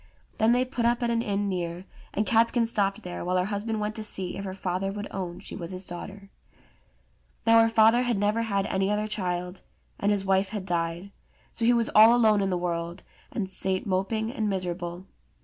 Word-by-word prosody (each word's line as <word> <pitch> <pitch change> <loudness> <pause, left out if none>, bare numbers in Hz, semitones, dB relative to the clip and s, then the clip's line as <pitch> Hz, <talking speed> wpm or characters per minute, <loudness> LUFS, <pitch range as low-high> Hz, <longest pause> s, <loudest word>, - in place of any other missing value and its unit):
Then 220 +1 +4
they 250 +1 +3
put 250 -2 -3
up 240 +1 +2
at 235 - +1
an 230 0 +1
inn 205 -2 -1
near, 175 -1 -3 0.3
and 210 - -1
Catskin 230 +1 +3
stopped 205 -1 0
there, 180 -1 -5
while 180 +1 0
her 180 - +1
husband 215 +2 -2
went 210 0 -2
to 220 - -4
see 190 -4 -1
if 195 - -5
her 190 -1 -5
father 190 +1 -2
would 205 +1 -5
own 180 -3 -5
she - - -8
was 170 - -6
his 185 0 -4
daughter. 195 +3 -8 1.1
Now 230 0 +7
her 225 - +4
father 225 +1 +5
had 245 -3 0
never 210 +3 +1
had 200 -3 0
any 190 -1 0
other 210 +1 0
child, 180 -3 -3 0.4
and 205 - +2
his 200 -2 0
wife 190 0 +2
had 205 -3 -5
died; 170 +2 -2 0.4
so 230 - -2
he 240 - +5
was 235 -1 +2
all 220 +3 +8
alone 215 -4 +4
in 195 - 0
the 180 - 0
world, 170 0 -3 0.3
and 200 -4 -2
sate 190 0 -2
moping 210 +4 -1
and 220 -6 -1
miserable. 180 -1 -4
200 Hz, 210 wpm, -27 LUFS, 185-220 Hz, 1.1 s, all